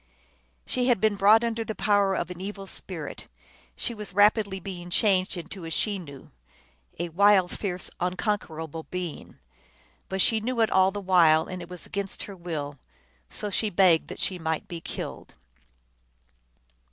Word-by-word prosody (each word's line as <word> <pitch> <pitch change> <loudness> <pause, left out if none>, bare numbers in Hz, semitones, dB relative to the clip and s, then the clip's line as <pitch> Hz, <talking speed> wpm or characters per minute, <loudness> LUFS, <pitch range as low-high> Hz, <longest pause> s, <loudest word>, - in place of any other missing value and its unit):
She 250 0 0
had 245 -5 +4
been 215 0 +2
brought 210 +3 +6
under 230 -1 -1
the 220 -1 -5
power 200 -2 +2
of 180 - -2
an 180 0 -8
evil 195 0 -6
spirit; - - -6 0.5
she 240 - 0
was 210 -4 -6
rapidly 205 -1 +4
being 175 -1 -7
changed 190 0 +2
into 175 +2 -8
a 165 - -5
Chenoo, 165 -6 -3 0.7
a 175 +1 -3
wild, 190 +1 +4
fierce, 185 -3 -2
unconquerable 175 -4 -3
being. 180 -4 -6 0.7
But 190 - -2
she 220 +4 +4
knew 240 +2 -2
it 220 - +3
all 190 0 +5
the 205 +1 -5
while, 170 -5 +5
and 185 -1 -6
it 170 - -9
was 180 -2 -3
against 200 -1 -3
her 200 - -8
will. 150 -6 -5 0.5
So 210 - -3
she 215 +2 0
begged 180 -4 +4
that - - -8
she 185 -2 -1
might 160 -1 -2
be 170 -1 -7
killed. - - -7
190 Hz, 160 wpm, -26 LUFS, 175-205 Hz, 0.7 s, brought